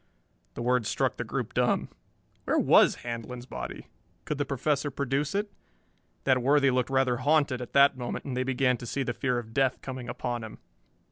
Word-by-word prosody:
The - - -4
words 125 -3 +1
struck - - 0
the - - -2
group - - -4
dumb. - - +1 0.6
Where - - +1
was - - +5
Handlon's 120 +1 -5
body? 60 - -7 0.4
Could 150 -2 -3
the 145 - +1
Professor 140 +1 0
produce 140 +3 -1
it? 205 0 -1 0.7
That 130 -1 +3
worthy 140 +1 +4
looked 125 0 0
rather 130 -2 +2
haunted 145 -1 +2
at 125 - -8
that 140 0 +6
moment, 120 -1 -4
and 130 - -4
they 130 - 0
began 130 -1 +1
to 120 - -8
see 135 +3 -1
the 125 - -2
fear 125 -1 -1
of 115 -2 -6
death 135 0 +1
coming 130 -2 -6
upon 120 -1 -3
him. 110 - -9
130 Hz, 190 wpm, -28 LUFS, 120-140 Hz, 0.7 s, that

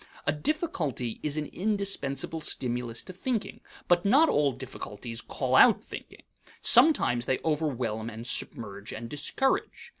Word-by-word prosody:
A - - +3
difficulty 150 - -2
is 150 0 -2
an 150 - -1
indispensable 190 -8 -1
stimulus 120 -5 -2
to 185 - -9
thinking, 220 +3 -3 0.3
but 175 0 +4
not 280 +11 +5
all 145 -2 +3
difficulties 115 -3 -7
call - - -2
out - - +7
thinking. - - -10 0.4
Sometimes 240 - +4
they 130 - +2
overwhelm 125 -8 -1
and 115 +1 -8
submerge 105 -4 -2
and 115 +2 -6
discourage. 205 - -1
140 Hz, 130 wpm, -28 LUFS, 120-190 Hz, 0.4 s, out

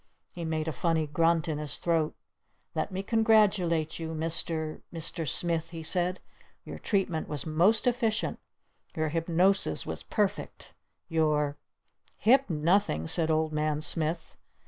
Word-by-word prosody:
He 175 - -7
made 160 0 -2
a - - 0
funny 160 +1 0
grunt 165 +2 +2
in 155 -2 -2
his 150 -1 -1
throat. 165 -3 0 0.6
"Let - - -2
me 190 +1 -3
congratulate 205 -8 +2
you, 160 0 -4
Mr. 160 0 -1
Mr. 165 -1 -1
Smith!" 165 +4 0
he 165 -1 -7
said. 180 +2 0 0.5
"Your - - -8
treatment 185 -6 -1
was 150 -3 -3
most 175 +8 +3
efficient! 235 -3 0 0.6
Your 155 -1 0
hypnosis 170 +4 +1
was - - -5
perfect! 205 -3 -3 0.3
Your 150 -3 +1 0.3
" - - -42 0.3
"Hip 260 +4 +4
nothing!" 155 - +1
said 160 - 0
Old 155 0 +1
Man 150 0 0
Smith. 160 +2 -2
165 Hz, 140 wpm, -29 LUFS, 155-185 Hz, 0.6 s, Hip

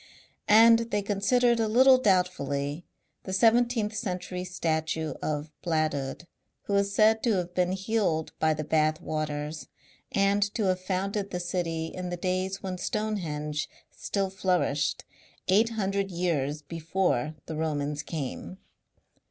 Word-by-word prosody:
And 230 +2 +6
they 205 -2 0
considered 235 +4 +2
a 225 - +2
little 255 +4 +6
doubtfully 175 - 0 0.3
the 190 - -6
seventeenth 225 +1 +3
century 180 -4 -3
statue 160 -3 -2
of 150 0 -3
Bladud, 155 -3 -1 0.4
who 200 - -3
is 200 0 +2
said 220 +2 +4
to 235 - +2
have 180 -2 -2
been 180 0 +1
healed 190 -5 0
by 155 0 +2
the 155 - -3
Bath 155 +1 +1
waters 155 -1 -4 0.4
and 200 +1 +2
to 225 - 0
have 185 -1 +1
founded 195 +2 -2
the 180 - -3
city 175 -2 -2
in 180 -1 -5
the 175 - -3
days 185 +2 -2
when 185 -1 -4
Stonehenge 160 -9 -2 0.2
still 195 -2 -2
flourished, 180 -7 0 0.4
eight 215 +5 +4
hundred 200 -3 -1
years 155 -5 -1
before 160 -2 -1
the 160 - -5
Romans 150 -2 -2
came. 155 +4 -5
180 Hz, 135 wpm, -28 LUFS, 155-200 Hz, 0.4 s, And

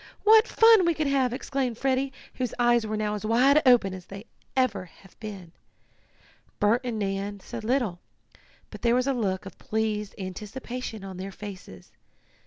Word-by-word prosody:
"What 440 +2 +7
fun 450 -3 +6
we 340 -1 +2
could 310 - -1
have!" 270 -3 +2
exclaimed 255 -2 -2
Freddie, 265 +1 0 0.2
whose 250 -2 -3
eyes 240 -2 +3
were 215 0 -2
now 210 -1 -1
as 210 - -5
wide 255 +7 +4
open 235 -7 +5
as 185 -1 -9 0.5
ever 205 -8 +1
they 175 - -21
had 195 - -18
been. 195 -6 -8 1.1
Bert 220 +4 +3
and 240 -3 -3
Nan 200 0 -3
said 230 +3 -8
little, 225 -7 0 0.7
but - - -10
there 235 0 +3
was 250 0 +2
a 275 - +1
look 200 -5 -2
of 195 - -11
pleased 215 -2 -2
anticipation 215 +4 -6
on 190 -2 -8
their 190 +1 -6
faces. 185 - -10
220 Hz, 170 wpm, -26 LUFS, 200-255 Hz, 1.1 s, What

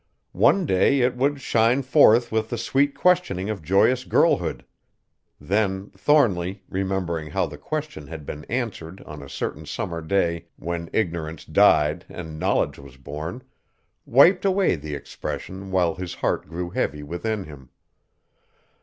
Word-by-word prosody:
One 195 -2 +4
day 135 +4 +3
it 125 0 +2
would 140 +2 0
shine 120 +2 +2
forth 125 -3 +5
with 110 0 0
the 120 - -3
sweet 140 +3 +1
questioning 170 - +1
of 100 -5 -5
joyous 100 - +3
girlhood. - - +1 0.7
Then 95 +4 -1
Thornly, 95 - +1
remembering 95 -5 -2
how - - 0
the - - -9
question 150 - -5
had 80 -2 -8
been 75 +1 -7
answered 105 -8 -4
on 75 -1 -9
a 70 - -10
certain - - -5
summer 85 -3 -4
day 85 0 0
when 85 0 -5
ignorance 80 -6 -2
died 75 +3 +3
and 80 -3 -8
knowledge - - 0
was 70 -2 -13
born, 75 - -7 0.6
wiped 170 +9 +6
away 195 -1 +3
the 75 -1 -6
expression 95 +6 -6
while 90 -3 +2
his 90 -1 -6
heart - - -1
grew 85 +2 -5
heavy 75 -2 -2
within 100 +7 -3
him. 70 -6 -13
95 Hz, 145 wpm, -24 LUFS, 80-120 Hz, 0.7 s, wiped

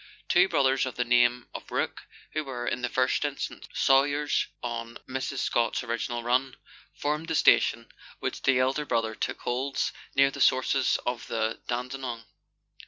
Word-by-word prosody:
Two 180 +2 +4
brothers 135 -1 +2
of 125 - -6
the 120 - 0
name 120 0 +3
of - - -8
Rourke, - - -3 0.3
who 155 - -1
were, 125 -3 -5
in 125 - -1
the 125 - -1
first 130 +3 +1
instance, 145 -2 -4
sawyers 145 +2 +3 0.2
on 115 -1 -4
Mrs. 130 +1 -3
Scott's 120 +2 0
original 120 0 -3
run, 125 +2 +1 0.4
formed 150 +2 -2
the - - -1
station, - - +4 0.3
which - - -3
the 135 -1 +3
elder 130 +4 +1
brother 115 -3 0
still - - -3
holds 130 +3 -1 0.2
near 135 0 +5
the - - -6
sources 130 +1 +3
of 125 -1 -3
the 110 -1 -1
Dandenong. 125 -1 -4
130 Hz, 160 wpm, -27 LUFS, 120-135 Hz, 0.4 s, near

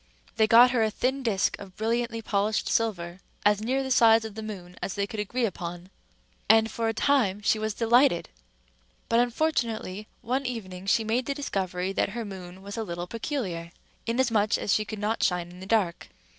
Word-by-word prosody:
They 220 -1 +4
got 240 +3 +7
her 245 -3 +2
a 220 - +3
thin 260 +5 -1
disc 210 -6 +1
of 190 -2 -11
brilliantly 230 +1 -1
polished 210 +1 0
silver, 185 -6 -1 0.3
as 205 0 +4
near 260 +5 0
the 265 - -4
size 225 -2 +5
of 220 - -7
the 220 - -6
moon 185 -5 -8
as 190 - -3
they 200 -1 0
could 220 0 -7
agree 235 +4 -1
upon; 175 -2 -6 0.6
and, 225 0 +5
for 230 -1 -1
a - - +2
time 210 -8 +2
she 215 - +2
was 215 -1 -2
delighted. 235 -4 +3 0.8
But, 230 - +4
unfortunately, 235 -6 -1 0.2
one 260 +3 -1
evening 190 -6 -6
she 225 - +3
made 230 +3 -1
the 280 - -1
discovery 190 -8 -2
that - - +1
her 230 - -3
moon 190 -1 -9
was 200 +2 -7
a 225 - -1
little 175 -3 -5
peculiar, 190 - -4 0.4
inasmuch 230 -3 +2
as 200 - 0
she 215 - +1
could 215 - -6
not 210 +2 -1
shine 175 -1 0
in 180 - -13
the 190 - -9
dark. 200 -6 0
215 Hz, 195 wpm, -27 LUFS, 190-235 Hz, 0.8 s, got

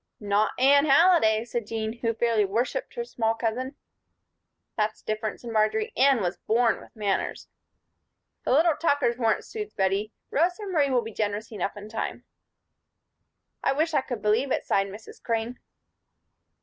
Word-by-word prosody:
"Not 205 +1 +1
Anne 280 +3 +5
Halliday," 275 -8 +5
said 235 -2 -4
Jean, 225 +1 -4
who 230 -1 -1
fairly 230 -2 +2
worshiped 235 - -2
her 475 - -2
small 225 - -1
cousin. 245 +4 -2 1.0
"That's 215 0 -1
different," 215 0 -3
said 235 - -7
Marjory. 215 0 +1
"Anne 265 -2 +4
was 175 -1 -1
born 230 +4 +1
with - - -17
manners." 205 -3 -2 0.9
"The - - -1
little 315 +4 +4
Tuckers 285 -7 +1
weren't," 225 -2 +1
soothed 425 -1 -7
Bettie. 195 +2 0 0.2
"Rosa 355 +7 +1
Marie 315 -8 +1
will 250 -3 +2
be 225 0 -8
generous 210 +1 -2
enough 205 -1 -3
in 205 +1 -8
time." 225 +1 -4 1.4
"I - - +2
wish 315 +3 0
I 285 - +3
could 245 -5 -6
believe 225 +6 +2
it," - - 0
sighed 195 0 +1
Mrs. 205 +3 -11
Crane. 230 +1 -2
230 Hz, 155 wpm, -26 LUFS, 215-270 Hz, 1.4 s, Anne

